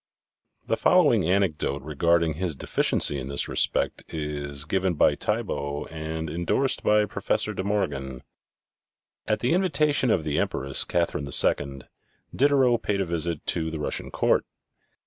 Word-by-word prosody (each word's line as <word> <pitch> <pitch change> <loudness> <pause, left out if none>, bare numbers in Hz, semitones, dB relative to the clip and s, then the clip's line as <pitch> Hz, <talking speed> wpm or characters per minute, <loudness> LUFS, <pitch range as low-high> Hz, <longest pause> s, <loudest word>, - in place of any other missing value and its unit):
The - - 0
following - - +4
anecdote 80 -7 0
regarding 85 +2 +1
his 85 0 -3
deficiency 70 +1 +1
in 65 - -6
this 70 +1 -1
respect - - +1
is 75 -2 -4
given 95 +2 0
by - - +4
Thiebault 70 +1 -3
and 80 0 -5
indorsed 85 - -1
by 105 0 +3
Professor - - -2
De - - -4
Morgan: 70 -11 -2 1.0
At 105 -1 0
the 125 - +2
invitation 150 -7 +2
of 90 -7 +2
the 75 -1 -1
Empress, 70 0 -1
Catherine 85 -4 -1
II, 70 -1 +1 0.5
Diderot 130 -4 +3
paid 100 -1 -1
a 95 - 0
visit 85 -2 -3
to 80 -1 -1
the 80 - -5
Russian 75 - -3
court. - - +1
80 Hz, 140 wpm, -25 LUFS, 75-100 Hz, 1.0 s, following